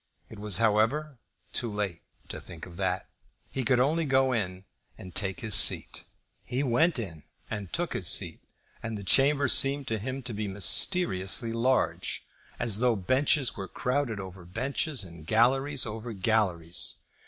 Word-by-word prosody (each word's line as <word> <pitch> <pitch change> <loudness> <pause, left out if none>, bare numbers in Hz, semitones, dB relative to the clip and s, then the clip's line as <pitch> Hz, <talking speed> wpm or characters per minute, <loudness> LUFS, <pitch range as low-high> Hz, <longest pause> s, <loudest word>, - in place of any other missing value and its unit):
It 110 - -10
was, 105 -3 0
however, 115 +7 +1 0.3
too 120 -3 0
late 100 -5 -3 0.3
to - - -7
think 80 - -10
of 85 -1 -13
that. - - -2 0.4
He 135 - -2
could 125 +1 +3
only 155 +6 +1
go 135 -2 +2
in 95 -4 -3 0.3
and 90 -2 -11
take 100 +5 -2
his 110 -3 -2
seat. 105 - +5 0.4
He 130 +3 -2
went 150 +6 +2
in 85 -9 -6 0.3
and 100 -5 -5
took - - -2
his - - -2
seat, - - +1 0.4
and 115 -2 -5
the 100 - -8
chamber 140 +7 +3
seemed 140 +2 +3
to 110 -1 -1
him 130 +5 -5
to 120 -1 -4
be 105 0 -3
mysteriously 105 - +3
large, 125 +3 0 0.3
as 110 -3 +1
though 125 -1 +2
benches 130 +5 +1
were 95 -1 -6
crowded 125 -3 -2
over 95 -1 -9
benches, 130 - -2
and 85 -3 -12
galleries 135 - +2
over 110 +1 -6
galleries. 95 -5 0
115 Hz, 160 wpm, -28 LUFS, 95-135 Hz, 0.4 s, seat